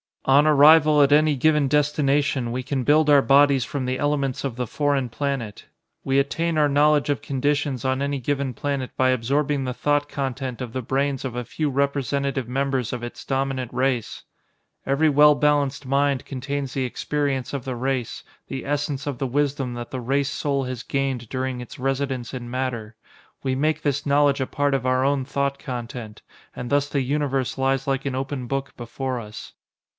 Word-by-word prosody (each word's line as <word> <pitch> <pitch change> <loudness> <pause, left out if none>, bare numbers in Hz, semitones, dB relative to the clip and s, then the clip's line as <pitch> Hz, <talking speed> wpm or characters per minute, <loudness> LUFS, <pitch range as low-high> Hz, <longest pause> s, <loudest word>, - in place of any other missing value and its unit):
"On 140 +3 +5
arrival 150 0 +6
at 140 0 +4
any 150 0 +4
given 150 +1 +3
destination, 140 -3 +1
we 125 +2 -2
can 130 0 -2
build 150 +4 +4
our 140 -2 +6
bodies 140 -2 +4
from 135 -1 -3
the 130 +1 -1
elements 140 -3 -1
of 135 -4 -3
the 125 -1 -3
foreign 140 -1 0
planet. 130 -5 -4 0.4
We 135 0 +1
attain 165 +4 0
our 150 -1 +4
knowledge 145 +1 +3
of 145 - 0
conditions 140 0 -1
on 130 +1 0
any 140 -1 -1
given 135 0 -2
planet 140 -1 -3
by 130 0 +3
absorbing 135 +3 0
the 125 -1 -3
thought 145 +2 0
content 130 -3 -4
of 120 -3 -6
the 130 - -2
brains 135 +2 -1
of 125 -2 -4
a 125 0 -3
few 150 +5 -2
representative 140 -1 -1
members 135 -2 -1
of 120 -1 -5
its 120 - -8
dominant 135 -2 -2
race. 130 -3 -1 0.6
Every 145 +4 +3
well 150 +1 +6
balanced 145 -1 +1
mind 140 0 +1
contains 140 0 -4
the 135 -2 -1
experience 140 0 -2
of 140 -3 -5
the 130 -2 -3
race, 130 -1 -2 0.2
the 135 - -5
essence 145 -1 -2
of 145 -3 -3
the 135 - -2
wisdom 135 -1 -1
that 120 0 -6
the 130 - -5
race 135 +3 0
soul 140 -1 -1
has 125 -1 -5
gained 135 -5 -2
during 130 -1 -3
its 125 +4 -10
residence 135 -2 -2
in 120 -2 -6
matter. 120 -3 -3 0.5
We 130 -1 0
make 155 +2 0
this 145 -1 -1
knowledge 145 -1 +3
a 130 - -1
part 145 -1 0
of 130 -2 -2
our 130 0 +2
own 135 -1 +1
thought 140 0 -1
content, 120 -3 -7 0.3
and 125 - -5
thus 145 0 +2
the 140 - 0
Universe 135 -1 -1
lies 135 0 +1
like 135 -1 -1
an 135 -2 -2
open 135 -1 -3
book 135 +1 -3
before 125 +1 -4
us. 105 -2 -9
135 Hz, 185 wpm, -23 LUFS, 130-145 Hz, 0.6 s, arrival